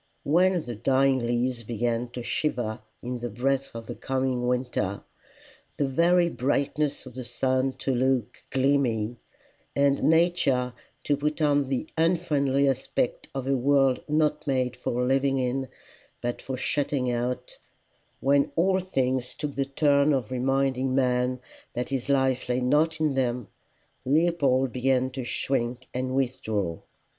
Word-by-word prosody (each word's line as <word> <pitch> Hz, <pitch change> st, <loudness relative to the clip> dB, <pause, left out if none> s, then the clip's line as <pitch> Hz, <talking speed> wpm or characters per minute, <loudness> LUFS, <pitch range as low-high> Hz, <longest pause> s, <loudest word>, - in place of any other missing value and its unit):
When 175 Hz, +3 st, +3 dB
the 120 Hz, -, -4 dB
dying 130 Hz, +4 st, +2 dB
leaves 120 Hz, 0 st, -1 dB
began 120 Hz, +1 st, -1 dB
to 125 Hz, -, -5 dB
shiver 120 Hz, -6 st, -1 dB, 0.2 s
in 125 Hz, 0 st, -4 dB
the 120 Hz, 0 st, -4 dB
breath 135 Hz, +5 st, 0 dB
of 115 Hz, 0 st, -6 dB
the -, -, -5 dB
coming 130 Hz, -2 st, -1 dB
winter, 125 Hz, -6 st, -1 dB, 0.7 s
the 140 Hz, -, +1 dB
very 170 Hz, +6 st, +3 dB
brightness 145 Hz, 0 st, -1 dB
of 130 Hz, -, -10 dB
the 130 Hz, +1 st, -6 dB
sun 130 Hz, +2 st, 0 dB
to 135 Hz, -, -2 dB
look 130 Hz, -3 st, 0 dB
gleamy, 130 Hz, -4 st, +1 dB, 0.6 s
and 140 Hz, 0 st, +3 dB
nature 155 Hz, -7 st, +2 dB, 0.3 s
to 145 Hz, -, +2 dB
put 150 Hz, +2 st, -2 dB
on 145 Hz, -2 st, +3 dB
the 135 Hz, +2 st, -2 dB
unfriendly 150 Hz, -5 st, +2 dB
aspect 130 Hz, -2 st, -1 dB
of 135 Hz, -2 st, -3 dB
a 135 Hz, 0 st, +2 dB
world 135 Hz, 0 st, +3 dB
not 150 Hz, 0 st, +1 dB
made 130 Hz, -2 st, 0 dB
for 125 Hz, 0 st, -1 dB
living 135 Hz, +1 st, +2 dB
in 130 Hz, +1 st, -1 dB, 0.5 s
but 120 Hz, 0 st, -3 dB
for 130 Hz, -1 st, -4 dB
shutting 135 Hz, -2 st, 0 dB
out 125 Hz, +1 st, -3 dB, 0.6 s
when 140 Hz, +1 st, +3 dB
all 185 Hz, +3 st, +3 dB
things 130 Hz, -8 st, -1 dB
took 150 Hz, -2 st, -4 dB
the 135 Hz, 0 st, -1 dB
turn 140 Hz, +1 st, +3 dB
of 130 Hz, -5 st, -1 dB
reminding 130 Hz, 0 st, +1 dB
man 125 Hz, -1 st, +1 dB, 0.3 s
that 125 Hz, +1 st, -3 dB
his 135 Hz, -1 st, -3 dB
life 130 Hz, -2 st, +1 dB
lay 125 Hz, 0 st, +1 dB
not 155 Hz, +5 st, +2 dB
in 155 Hz, -2 st, +1 dB
them, 125 Hz, -3 st, -1 dB, 0.5 s
Leopold 140 Hz, -3 st, +2 dB
began 130 Hz, +1 st, +1 dB
to 130 Hz, 0 st, -5 dB
shrink 125 Hz, 0 st, -2 dB
and 130 Hz, +1 st, -2 dB
withdraw. 110 Hz, -9 st, -1 dB
130 Hz, 145 wpm, -26 LUFS, 125-140 Hz, 0.7 s, When